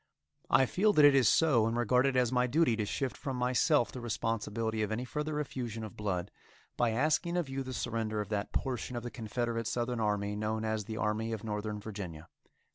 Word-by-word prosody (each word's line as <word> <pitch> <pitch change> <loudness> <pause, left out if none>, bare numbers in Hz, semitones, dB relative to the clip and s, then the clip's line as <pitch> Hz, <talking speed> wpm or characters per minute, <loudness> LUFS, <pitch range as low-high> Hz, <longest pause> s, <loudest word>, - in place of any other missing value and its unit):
I 130 +3 +5
feel 205 - +2
that 150 -4 +7
it 145 - +8
is 130 -4 +5
so, 130 -9 +4
and 115 +1 -1
regard 125 +3 +3
it 135 - 0
as 125 -2 +3
my 125 0 +2
duty 145 -2 +3
to 105 -2 -1
shift 130 +4 -2
from 135 -2 -4
myself 125 +2 +2
the 125 - -7
responsibility 110 -1 -2
of 105 - -1
any 120 +3 -2
further 150 +3 -3
effusion 120 -6 -4
of 110 - -8
blood, 100 -3 -2 0.4
by 120 - +2
asking 155 +9 +1
of 170 -6 -1
you 135 0 -3
the 130 -1 -5
surrender 115 -3 -2
of 105 -1 -3
that 105 -1 -2
portion 125 -1 -2
of 120 - -4
the 120 - -5
Confederate 115 0 -2
southern 120 0 -1
army 105 -1 0
known 110 +1 -2
as 110 -2 -1
the 110 +1 -5
Army 110 0 -1
of 110 -1 -5
Northern 105 -1 -3
Virginia. 95 -7 -7
115 Hz, 210 wpm, -31 LUFS, 110-130 Hz, 0.4 s, it